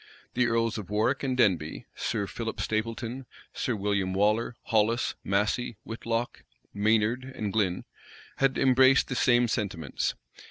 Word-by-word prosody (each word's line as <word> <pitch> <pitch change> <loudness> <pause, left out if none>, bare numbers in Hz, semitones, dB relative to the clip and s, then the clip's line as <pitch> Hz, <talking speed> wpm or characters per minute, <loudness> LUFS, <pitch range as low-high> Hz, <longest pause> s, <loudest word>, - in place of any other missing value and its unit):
The 125 0 +2
earls 115 -1 0
of 100 - -8
Warwick 110 +6 +1
and 130 -2 -1
Denbigh, 90 -10 +1
Sir 105 -3 -2
Philip 115 +2 -5
Stapleton, 115 +3 -3 0.3
Sir 120 - -1
William 100 -2 -1
Waller, 105 +4 +1
Hollis, 115 +2 +1
Massey, 105 +3 0
Whitlocke, 115 +1 -3 0.3
Maynard, 110 +5 +1 0.2
Glyn, 95 -4 0 0.5
had 135 -1 +2
embraced 130 0 +5
the 125 - -2
same 120 0 +4
sentiments. 95 - -2
115 Hz, 125 wpm, -28 LUFS, 105-120 Hz, 0.5 s, embraced